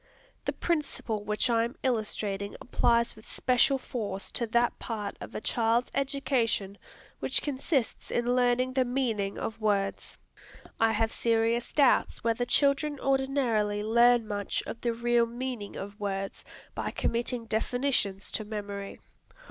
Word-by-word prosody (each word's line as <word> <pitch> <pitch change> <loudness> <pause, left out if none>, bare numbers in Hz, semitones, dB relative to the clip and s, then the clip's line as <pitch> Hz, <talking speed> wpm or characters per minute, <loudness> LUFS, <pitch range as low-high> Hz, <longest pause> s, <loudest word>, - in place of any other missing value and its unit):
The - - +1
principle 275 -10 -2
which 210 0 0
I 230 -2 +3
am 235 +3 -4
illustrating 210 -4 -1
applies 235 -1 +2
with 220 - -15
special 255 +2 +3
force 205 -7 -5
to 235 - -1
that 235 +2 +1
part 210 -3 -4
of - - -8
a - - -3
child's 230 +2 +1
education 265 -7 0 0.4
which - - +1
consists 275 -2 -1
in 240 +1 +1
learning 250 +1 +2
the 260 0 +3
meaning 240 -6 -1
of 225 0 -4
words. 200 -2 0 0.6
I 225 0 +4
have 225 +1 +1
serious 230 +1 +1
doubts 280 -4 +3
whether 230 +1 +1
children 280 +2 +3
ordinarily 260 -7 +1
learn 235 +1 +4
much 205 -1 -2
of 230 - -7
the 240 - +1
real 235 0 +2
meaning 240 -3 -5
of 200 +2 -7
words 195 -1 -3 0.3
by - - -3
committing 235 0 -2
definitions 225 -3 0
to 215 - -1
memory. 205 -2 -6
230 Hz, 140 wpm, -29 LUFS, 210-250 Hz, 0.6 s, I